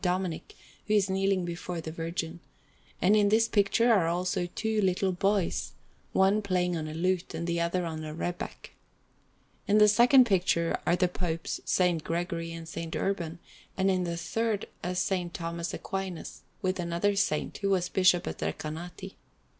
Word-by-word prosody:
Dominic, 185 - -2 0.3
who 215 - +3
is 195 -2 +2
kneeling 195 -1 +1
before 175 0 -4
the 160 -1 -6
Virgin; 165 +1 -4 0.6
and 195 +4 +5
in 205 -1 +4
this 225 +2 +4
picture 230 +3 +3
are 185 -6 +3
also 175 +1 0
two 220 -1 0
little 190 0 +1
boys, 185 - 0 0.4
one 195 +3 +3
playing 180 -3 0
on 155 -2 -3
a 155 - -6
lute 180 0 -1
and 165 +1 -3
the 170 0 0
other 170 +1 0
on 160 -1 -4
a 155 - -5
rebeck. 175 +3 -5 1.0
In 205 - +4
the 210 0 +7
second 245 +5 +6
picture 180 -5 +2
are 175 - +4
the 180 0 +2
Popes 170 -2 -3 0.2
S. 175 -3 +3
Gregory 165 0 -3
and 165 0 -7
S. 165 0 -5
Urban; 175 -4 -2 0.4
and 190 0 +3
in 185 -1 +1
the 170 -1 -3
third 215 +4 -1 0.2
is 180 +2 -1
S. 185 -2 +1
Thomas 170 0 -4
Aquinas, 190 -3 -5 0.2
with 185 0 0
another 175 +4 0
saint, 195 -6 0
who 200 - 0
was 185 -2 +2
Bishop 185 -1 +3
of - - -4
Recanati. 175 +5 -5
180 Hz, 170 wpm, -29 LUFS, 170-195 Hz, 1.0 s, the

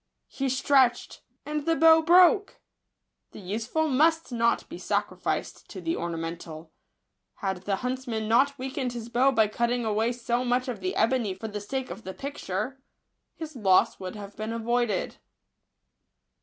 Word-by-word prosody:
He 270 -1 -2
stretched 260 -1 +2
— - - -48
and 300 0 -3
the 330 - +3
bow 320 0 +6
broke! 360 +5 +5 0.7
The - - -9
useful 225 - -2
must 320 +3 +2
not 235 -1 +1
be - - -9
sacrificed - - -3
to - - -8
the 330 +1 -2
orna 170 -1 -3
mental. 165 -1 -7 0.6
Had 190 -2 -4
the 200 - +1
huntsman 250 -4 -3
not 270 +5 +3
weakened 260 -1 -3
his 235 -1 -7
bow 250 +3 +3
by 220 -4 +3
cutting 235 +2 -1
away 220 +2 +1
so 240 +1 -1
much 250 +1 0
of 240 -5 -4
the 185 -1 -3
ebony 225 -4 +1
for 220 +4 -6
the 210 0 -5
sake 265 +5 -4
of 225 - -8
the 190 - -7
picture, 265 -2 -4 0.5
his 315 -2 -8
loss 195 -6 +3
would 185 0 -6
have 205 -1 -9
been 215 +1 -4
avoided. 230 -3 -1
240 Hz, 160 wpm, -27 LUFS, 210-270 Hz, 0.7 s, bow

